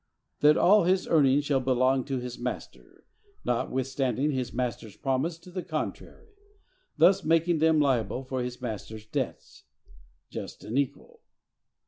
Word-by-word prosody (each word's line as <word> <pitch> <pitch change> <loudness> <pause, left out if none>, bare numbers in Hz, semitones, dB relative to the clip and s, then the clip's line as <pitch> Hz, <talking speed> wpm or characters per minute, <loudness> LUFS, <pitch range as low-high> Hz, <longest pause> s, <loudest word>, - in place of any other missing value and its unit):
That 150 +1 +5
all 205 0 +5
his 185 +1 +2
earnings 145 -2 +4
shall 140 -2 +2
belong 130 0 +2
to 135 -2 -2
his 125 -1 -6
master, 125 +1 -7 0.4
notwithstanding 130 +3 0
his 130 -3 -2
master's 120 -4 -4
promise 135 +5 -1
to 180 +2 -15
the 185 0 -4
contrary; 435 - -6 0.7
thus 185 +5 +5
making 165 +1 +2
them 160 0 +4
liable 130 -4 +1
for 130 -1 -3
his 125 0 -5
master's 110 -2 -6
debts.—Just 65 - -8
and 120 +6 -1
equal! 145 - -4
135 Hz, 130 wpm, -28 LUFS, 125-160 Hz, 0.7 s, That